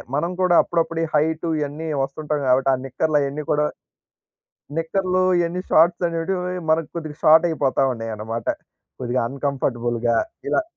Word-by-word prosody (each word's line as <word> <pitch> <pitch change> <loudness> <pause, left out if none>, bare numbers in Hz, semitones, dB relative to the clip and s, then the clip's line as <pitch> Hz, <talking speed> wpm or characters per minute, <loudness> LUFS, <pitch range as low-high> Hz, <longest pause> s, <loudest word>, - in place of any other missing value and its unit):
మనం 170 +5 0
కూడా 180 -1 +4
అప్పుడప్పుడు 165 -1 -1
ఈ - - +1
హైట్ 160 +2 +1
ఇయన్నీ 150 +2 -4 0.2
వస్తుంటాం 150 +2 -3
కాబట్టి 130 +1 +3
ఆ - - +3
నిక్కర్లు 150 +3 0
అయన్నీ 140 +2 -3
కూడా, 150 0 +2 1.1
నిక్కర్లు 185 +2 0 0.2
ఇయన్నీ 170 +1 -1
షార్ట్స్ 170 +2 +4
అనేటివి 180 +2 -2
మనకు 160 -1 +2
కొద్దిగా 155 -3 -6
షార్ట్ 160 +2 +7
అయిపోతా 145 -4 +1
ఉన్నయనమాట. 115 0 -5 0.5
కొద్దిగా 125 0 0
అన్‌కంఫర్టబుల్‌గా 120 -4 -1 0.3
ఇలా. 345 - +2
150 Hz, 135 wpm, -22 LUFS, 135-165 Hz, 1.1 s, షార్ట్